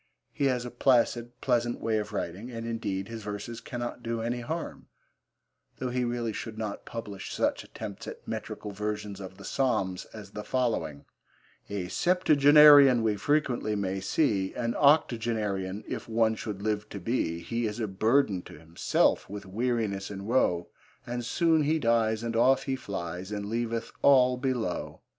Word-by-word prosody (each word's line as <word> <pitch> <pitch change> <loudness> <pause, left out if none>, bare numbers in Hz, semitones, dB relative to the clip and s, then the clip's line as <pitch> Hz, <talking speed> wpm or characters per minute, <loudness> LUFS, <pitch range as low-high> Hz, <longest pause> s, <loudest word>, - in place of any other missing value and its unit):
He 140 - -1
has 125 -2 +1
a 125 - -6
placid, 120 -1 +2
pleasant 120 -2 +1
way 110 -1 0
of 105 0 -5
writing, 100 +3 -4
and, 115 -2 -6
indeed, 100 -4 -3
his 115 -1 -7
verses 105 +3 -6
cannot 120 0 -5
do 115 -1 -3
any 120 +2 -2
harm, 160 +8 -5 0.9
though 130 -1 -3
he 125 0 0
really 120 -2 -2
should 110 0 -6
not 110 -2 -5
publish 105 -4 -6
such - - 0
attempts - - -8
at - - -9
metrical 105 - -5
versions 105 0 -4
of 95 -1 -9
the - - -11
Psalms 95 -9 0
as 105 -2 -11
the 105 0 -6
following: 115 - -1 0.6
A 100 -3 -3
septuagenarian 145 - +6
We 110 -2 +2
frequently 125 -4 0
may 95 -1 -1
see; 95 -3 0
An 115 -1 -1
octogenarian 110 -9 +1
If 120 -2 -5
one 110 0 +3
should 105 -2 -6
live 105 -1 -1
to 100 - -6
be, 90 -4 -1
He 115 +3 -2
is 105 +2 -5
a 110 - -1
burden 105 0 +2
to - - -12
himself 80 +2 +1
With 100 0 -7
weariness 105 -1 -1
and 100 -1 -7
woe 95 -8 +1 0.4
And 120 0 -4
soon 160 +6 +2
he 155 +2 +2
dies, 115 -4 +2
and 115 -1 -3
off 130 +3 +4
he 135 -2 -1
flies, 95 -6 -5
And 105 -1 -3
leaveth 115 +1 -2
all 130 -2 +6
below. 125 -8 -2
115 Hz, 165 wpm, -28 LUFS, 100-125 Hz, 0.9 s, septuagenarian